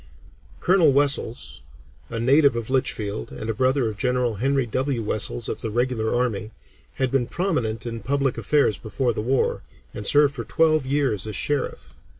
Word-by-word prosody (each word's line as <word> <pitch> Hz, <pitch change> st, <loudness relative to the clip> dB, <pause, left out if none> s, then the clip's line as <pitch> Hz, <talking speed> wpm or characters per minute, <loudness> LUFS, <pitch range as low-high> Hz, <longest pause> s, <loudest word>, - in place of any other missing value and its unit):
Colonel 175 Hz, -5 st, +4 dB
Wessells, 140 Hz, -, +1 dB, 0.5 s
a 115 Hz, -, -4 dB
native 140 Hz, +2 st, +4 dB
of 115 Hz, +1 st, -4 dB
Litchfield, 105 Hz, -, -1 dB
and 110 Hz, +12 st, -4 dB
a -, -, -3 dB
brother 130 Hz, +2 st, +1 dB
of 110 Hz, -2 st, -5 dB
General 125 Hz, -3 st, 0 dB
Henry 135 Hz, +3 st, +1 dB
W. 130 Hz, +1 st, -2 dB
Wessells 100 Hz, -, 0 dB
of -, -, -4 dB
the 110 Hz, -, -3 dB
regular 120 Hz, -1 st, -1 dB
army, 110 Hz, -4 st, -1 dB, 0.5 s
had 130 Hz, -2 st, -1 dB
been 135 Hz, -3 st, +1 dB
prominent 125 Hz, -, -2 dB
in 115 Hz, -1 st, -4 dB
public 135 Hz, +1 st, -1 dB
affairs 115 Hz, -1 st, +1 dB
before 120 Hz, +3 st, -1 dB
the 105 Hz, -, -3 dB
war, 130 Hz, +4 st, 0 dB, 0.3 s
and 105 Hz, -, -4 dB
served 145 Hz, -1 st, +5 dB
for 120 Hz, -4 st, -5 dB
twelve 155 Hz, -2 st, +2 dB
years 130 Hz, -8 st, 0 dB
as 105 Hz, -, -5 dB
Sheriff. 145 Hz, +4 st, -3 dB
125 Hz, 165 wpm, -23 LUFS, 110-140 Hz, 0.5 s, served